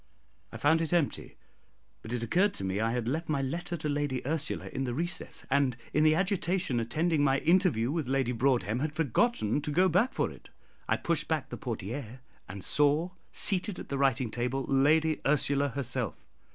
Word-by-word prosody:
I -, -, -7 dB
found 160 Hz, +3 st, +3 dB
it 165 Hz, +1 st, -2 dB
empty, 170 Hz, -5 st, -1 dB, 0.6 s
but 110 Hz, -, -9 dB
it 120 Hz, -1 st, -2 dB
occurred 185 Hz, -, +2 dB
to -, -, -3 dB
me 95 Hz, +1 st, -1 dB
I 115 Hz, +1 st, +1 dB
had 120 Hz, -1 st, -2 dB
left 155 Hz, +5 st, -2 dB
my 140 Hz, -3 st, 0 dB
letter 170 Hz, +5 st, -3 dB
to 155 Hz, -, -4 dB
Lady 145 Hz, -4 st, -2 dB
Ursula 155 Hz, +1 st, -2 dB
in 135 Hz, -, -3 dB
the 120 Hz, -2 st, -3 dB
recess, 175 Hz, +4 st, -3 dB
and 135 Hz, -3 st, +2 dB, 0.2 s
in 150 Hz, -, +3 dB
the 155 Hz, 0 st, +5 dB
agitation 180 Hz, -6 st, 0 dB
attending 150 Hz, +7 st, 0 dB
my 135 Hz, -1 st, +3 dB
interview 160 Hz, -, +2 dB
with 160 Hz, -4 st, -2 dB
Lady 135 Hz, -2 st, +1 dB
Broadhem, 120 Hz, -3 st, +1 dB
had 150 Hz, +2 st, -2 dB
forgotten 150 Hz, -, +1 dB
to 150 Hz, -, -4 dB
go 180 Hz, +6 st, +3 dB
back 195 Hz, +9 st, +2 dB
for -, -, -1 dB
it. -, -, -15 dB, 0.4 s
I -, -, +3 dB
pushed 165 Hz, -2 st, 0 dB
back 160 Hz, -3 st, -2 dB
the -, -, -5 dB
portière, 120 Hz, 0 st, -5 dB, 0.3 s
and 95 Hz, 0 st, -7 dB
saw 150 Hz, +4 st, +3 dB, 0.2 s
seated 195 Hz, -1 st, +2 dB
at -, -, -9 dB
the 140 Hz, -, -2 dB
writing 130 Hz, -4 st, +1 dB
table 125 Hz, +3 st, -2 dB
Lady 155 Hz, +3 st, +3 dB
Ursula 140 Hz, 0 st, +2 dB
herself. 125 Hz, -, -3 dB
140 Hz, 190 wpm, -29 LUFS, 125-160 Hz, 0.6 s, the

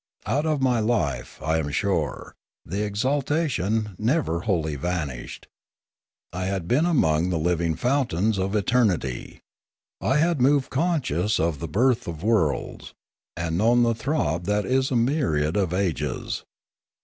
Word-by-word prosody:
Out 150 Hz, +3 st, 0 dB
of 150 Hz, -4 st, 0 dB
my 125 Hz, -3 st, +3 dB
life, 105 Hz, -, -1 dB
I 80 Hz, +1 st, +1 dB
am 75 Hz, -2 st, -2 dB
sure, 80 Hz, 0 st, -1 dB, 0.3 s
the 95 Hz, -, -4 dB
exalta 140 Hz, +9 st, 0 dB
tion 105 Hz, -, -1 dB
never 115 Hz, -, +1 dB
wholly 80 Hz, -5 st, -1 dB
vanished. 70 Hz, -5 st, -4 dB, 0.9 s
I 90 Hz, +1 st, -3 dB
had 95 Hz, -3 st, -2 dB
been 145 Hz, -, +3 dB
among 85 Hz, -, +2 dB
the 90 Hz, -, 0 dB
living 85 Hz, 0 st, 0 dB
fountains 110 Hz, -, +1 dB
of 95 Hz, +2 st, -1 dB
eternity. 100 Hz, -, 0 dB, 0.6 s
I 135 Hz, -, +2 dB
had 165 Hz, -2 st, +2 dB
moved 140 Hz, +1 st, +3 dB
conscious 130 Hz, -, 0 dB
of 80 Hz, -3 st, 0 dB
the 85 Hz, -, -4 dB
birth 120 Hz, -, +1 dB
of 85 Hz, -1 st, -6 dB
worlds, 100 Hz, -10 st, 0 dB, 0.4 s
and 85 Hz, 0 st, -1 dB
known 120 Hz, +3 st, +4 dB
the 115 Hz, 0 st, +3 dB
throb 110 Hz, -, -1 dB
that 105 Hz, +1 st, 0 dB
is 130 Hz, +3 st, +1 dB
a 130 Hz, -, -1 dB
myriad 115 Hz, -, +1 dB
of 95 Hz, -5 st, +1 dB
ages. 85 Hz, -7 st, -2 dB
100 Hz, 145 wpm, -24 LUFS, 85-130 Hz, 0.9 s, known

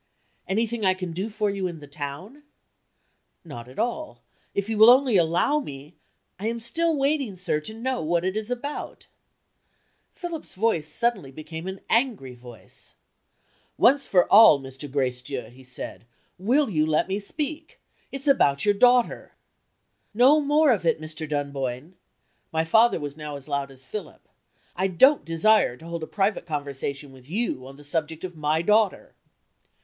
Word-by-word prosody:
"Anything 225 Hz, +3 st, -1 dB
I 185 Hz, -1 st, +3 dB
can 185 Hz, -2 st, -5 dB
do 190 Hz, +6 st, -3 dB
for 210 Hz, -1 st, -1 dB
you 195 Hz, -2 st, -2 dB
in 170 Hz, -3 st, -7 dB
the 145 Hz, -, -11 dB
town?" 145 Hz, -, -8 dB, 1.0 s
"Not 120 Hz, -7 st, -9 dB
at 130 Hz, -, -15 dB
all. 245 Hz, +7 st, -3 dB, 0.3 s
If 200 Hz, 0 st, -1 dB
you 220 Hz, -1 st, -2 dB
will 220 Hz, +2 st, +9 dB
only 255 Hz, -2 st, +5 dB
allow 175 Hz, -, +2 dB
me 145 Hz, -, -9 dB, 0.2 s
" -, -, -49 dB
"I 210 Hz, -, -3 dB
am 235 Hz, +1 st, -2 dB
still 330 Hz, +7 st, +1 dB
waiting, 275 Hz, -6 st, 0 dB
sir, 180 Hz, -4 st, -1 dB
to 155 Hz, +8 st, -7 dB
know 255 Hz, +3 st, -2 dB
what 170 Hz, +2 st, 0 dB
it 190 Hz, +1 st, -1 dB
is 215 Hz, +1 st, -3 dB
about." 265 Hz, +4 st, -5 dB, 1.1 s
Philip's 345 Hz, -4 st, -7 dB
voice 185 Hz, -7 st, 0 dB
suddenly 195 Hz, -, -1 dB
became 160 Hz, +5 st, -8 dB
an 190 Hz, 0 st, -6 dB
angry 225 Hz, -, 0 dB
voice. 120 Hz, -2 st, -13 dB, 0.8 s
"Once 275 Hz, +2 st, +4 dB
for 180 Hz, -2 st, +4 dB
all, 210 Hz, -9 st, +9 dB
Mr. 135 Hz, +1 st, -9 dB
Gracedieu," 125 Hz, -3 st, -3 dB
he 130 Hz, +2 st, -16 dB
said, 125 Hz, -2 st, -8 dB, 0.3 s
"will 255 Hz, +10 st, +2 dB
you 155 Hz, -4 st, +2 dB
let 155 Hz, +1 st, +1 dB
me 195 Hz, +2 st, -2 dB
speak? 305 Hz, +8 st, -5 dB, 0.3 s
It's 275 Hz, +2 st, -6 dB
about 145 Hz, -, +3 dB
your 205 Hz, -, +4 dB
daughter 245 Hz, +3 st, +2 dB, 0.4 s
" -, -, -49 dB, 0.3 s
"No 265 Hz, +7 st, +6 dB
more 295 Hz, 0 st, +3 dB
of 210 Hz, -7 st, 0 dB
it, 165 Hz, -1 st, +1 dB
Mr. 155 Hz, 0 st, -6 dB
Dunboyne!" 140 Hz, +1 st, -3 dB, 0.6 s
(My 160 Hz, 0 st, +1 dB
father 225 Hz, +4 st, +4 dB
was 145 Hz, -2 st, -6 dB
now 150 Hz, -1 st, -6 dB
as 140 Hz, 0 st, -10 dB
loud 140 Hz, -1 st, -2 dB
as 135 Hz, -1 st, -16 dB
Philip.) 190 Hz, +3 st, -8 dB, 0.5 s
"I 190 Hz, +2 st, +1 dB
don't 260 Hz, -, +4 dB
desire 165 Hz, -, +2 dB
to 160 Hz, -, -14 dB
hold 170 Hz, 0 st, -5 dB
a 155 Hz, -, -5 dB
private 195 Hz, -3 st, -1 dB
conversation 140 Hz, -2 st, -5 dB
with 130 Hz, 0 st, -17 dB
you 180 Hz, -, -2 dB
on 135 Hz, +1 st, -12 dB
the 145 Hz, -, -14 dB
subject 160 Hz, +1 st, -3 dB
of 180 Hz, -2 st, -6 dB
my 155 Hz, +1 st, 0 dB
daughter." 210 Hz, +1 st, +1 dB
180 Hz, 170 wpm, -25 LUFS, 145-230 Hz, 1.1 s, will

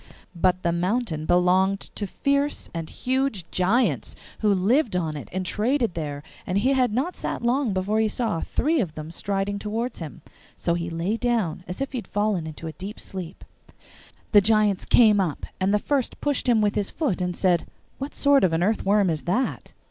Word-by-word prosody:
But 180 Hz, +1 st, +1 dB
the 170 Hz, -, +2 dB
mountain 175 Hz, -2 st, -1 dB
belonged 185 Hz, +2 st, +3 dB
to 205 Hz, -, -3 dB
fierce 280 Hz, +7 st, -1 dB
and 165 Hz, -2 st, -4 dB
huge 260 Hz, -8 st, -1 dB
giants, 185 Hz, -, +1 dB, 0.2 s
who 210 Hz, -2 st, +3 dB
lived 210 Hz, +5 st, +2 dB
on 160 Hz, -4 st, -1 dB
it 145 Hz, -, -7 dB
and 185 Hz, +1 st, -3 dB
traded 230 Hz, +2 st, 0 dB
there, 145 Hz, -3 st, -4 dB, 0.2 s
and 185 Hz, -, 0 dB
he 255 Hz, +7 st, +3 dB
had 255 Hz, -3 st, +2 dB
not 270 Hz, +11 st, -1 dB
sat -, -, -4 dB
long 245 Hz, 0 st, +1 dB
before 195 Hz, +3 st, 0 dB
he 220 Hz, -, +3 dB
saw 215 Hz, -5 st, -1 dB
three 315 Hz, +3 st, 0 dB
of 170 Hz, -7 st, -4 dB
them 155 Hz, +1 st, -7 dB
striding 200 Hz, +2 st, -2 dB
towards 225 Hz, +4 st, -3 dB
him. 155 Hz, -6 st, -8 dB, 0.3 s
So 170 Hz, -, 0 dB
he 170 Hz, 0 st, -2 dB
lay 170 Hz, +7 st, -1 dB
down 225 Hz, -9 st, 0 dB
as 180 Hz, +8 st, -6 dB
if 275 Hz, -, -2 dB
he 260 Hz, -, -2 dB
had 210 Hz, -, -10 dB
fallen 205 Hz, -5 st, 0 dB
into 155 Hz, +1 st, -8 dB
a 160 Hz, -, -4 dB
deep 195 Hz, +5 st, -8 dB
sleep. 185 Hz, -2 st, -7 dB, 0.9 s
The 205 Hz, -, +7 dB
giants 210 Hz, -2 st, +2 dB
came 215 Hz, -4 st, +5 dB
up, 175 Hz, -6 st, -1 dB
and 190 Hz, +1 st, +2 dB
the 210 Hz, -, +4 dB
first 270 Hz, +4 st, -1 dB
pushed 285 Hz, -3 st, 0 dB
him 230 Hz, -3 st, +4 dB
with 205 Hz, 0 st, +2 dB
his 205 Hz, -2 st, -1 dB
foot, 260 Hz, -, -1 dB
and 180 Hz, -1 st, -1 dB
said, 180 Hz, -3 st, +2 dB, 0.3 s
'What 275 Hz, +2 st, -5 dB
sort 280 Hz, -3 st, +4 dB
of 180 Hz, -3 st, +3 dB
an 165 Hz, +2 st, +1 dB
earthworm 205 Hz, 0 st, +2 dB
is 155 Hz, -2 st, -4 dB
that? 240 Hz, +10 st, -1 dB
200 Hz, 195 wpm, -25 LUFS, 180-235 Hz, 0.9 s, The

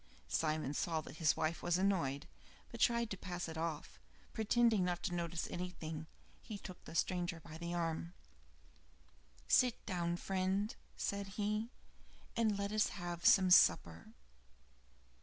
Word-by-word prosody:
Simon 155 Hz, -3 st, 0 dB
saw 165 Hz, -1 st, 0 dB
that 155 Hz, 0 st, -10 dB
his 160 Hz, -3 st, +3 dB
wife 160 Hz, +2 st, -1 dB
was 175 Hz, 0 st, +2 dB
annoyed, 170 Hz, -8 st, 0 dB, 0.4 s
but -, -, -8 dB
tried 235 Hz, -1 st, +2 dB
to 195 Hz, -, -3 dB
pass 180 Hz, -2 st, -4 dB
it 160 Hz, -, -6 dB
off. 160 Hz, -1 st, -4 dB, 0.3 s
Pretending 220 Hz, -2 st, +3 dB
not 175 Hz, -1 st, -1 dB
to 180 Hz, -, -1 dB
notice 170 Hz, -1 st, -2 dB
anything, 165 Hz, -3 st, -5 dB, 0.3 s
he 215 Hz, -3 st, -7 dB
took 185 Hz, -2 st, -10 dB
the -, -, -9 dB
stranger 175 Hz, -1 st, 0 dB
by 160 Hz, 0 st, -10 dB
the 170 Hz, 0 st, -3 dB
arm. 170 Hz, 0 st, -2 dB, 1.3 s
"Sit 250 Hz, -2 st, +3 dB
down, 175 Hz, -2 st, -1 dB
friend," 190 Hz, +3 st, -1 dB, 0.2 s
said 200 Hz, 0 st, -2 dB
he, 210 Hz, +2 st, 0 dB, 0.7 s
"and 220 Hz, -3 st, +2 dB
let 200 Hz, 0 st, -2 dB
us 215 Hz, 0 st, +3 dB
have 175 Hz, -2 st, -2 dB
some 185 Hz, -2 st, +6 dB
supper." 85 Hz, -, +5 dB
175 Hz, 140 wpm, -36 LUFS, 165-200 Hz, 1.3 s, some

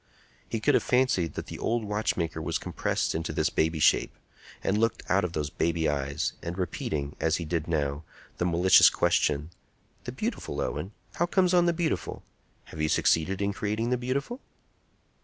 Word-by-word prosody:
He 115 Hz, -, -2 dB
could 145 Hz, +7 st, +2 dB
have -, -, +4 dB
fancied 125 Hz, -10 st, +1 dB
that -, -, -4 dB
the -, -, -8 dB
old 115 Hz, -1 st, -1 dB
watchmaker 90 Hz, -6 st, -1 dB
was 80 Hz, -, -1 dB
compressed -, -, -2 dB
into 80 Hz, 0 st, -3 dB
this -, -, 0 dB
baby 80 Hz, +1 st, +1 dB
shape, 75 Hz, -, +3 dB, 0.5 s
and 105 Hz, +2 st, +1 dB
looking 115 Hz, -2 st, 0 dB
out 100 Hz, +1 st, +3 dB
of 90 Hz, -2 st, -2 dB
those 75 Hz, -2 st, -2 dB
baby 85 Hz, -1 st, 0 dB
eyes, 70 Hz, -1 st, -1 dB
and 85 Hz, +2 st, -5 dB
repeating, 75 Hz, -5 st, -3 dB
as 80 Hz, -1 st, +2 dB
he 85 Hz, -, -3 dB
now -, -, -9 dB
did, 75 Hz, -3 st, -1 dB, 0.4 s
the 90 Hz, -, +1 dB
malicious 90 Hz, +2 st, +6 dB
question: 75 Hz, +2 st, +1 dB, 0.5 s
"The -, -, -4 dB
beautiful, -, -, -4 dB
Owen! 100 Hz, -, -3 dB, 0.2 s
How 175 Hz, -, +2 dB
comes 185 Hz, 0 st, +2 dB
on 175 Hz, -1 st, +4 dB
the -, -, +4 dB
beautiful? 165 Hz, -1 st, -2 dB, 0.4 s
Have 80 Hz, -, -8 dB
you 75 Hz, -, +1 dB
succeeded 95 Hz, +6 st, +2 dB
in 100 Hz, 0 st, 0 dB
creating 110 Hz, +4 st, -2 dB
the -, -, +3 dB
beautiful?" 140 Hz, -, -3 dB
90 Hz, 175 wpm, -28 LUFS, 80-115 Hz, 0.5 s, malicious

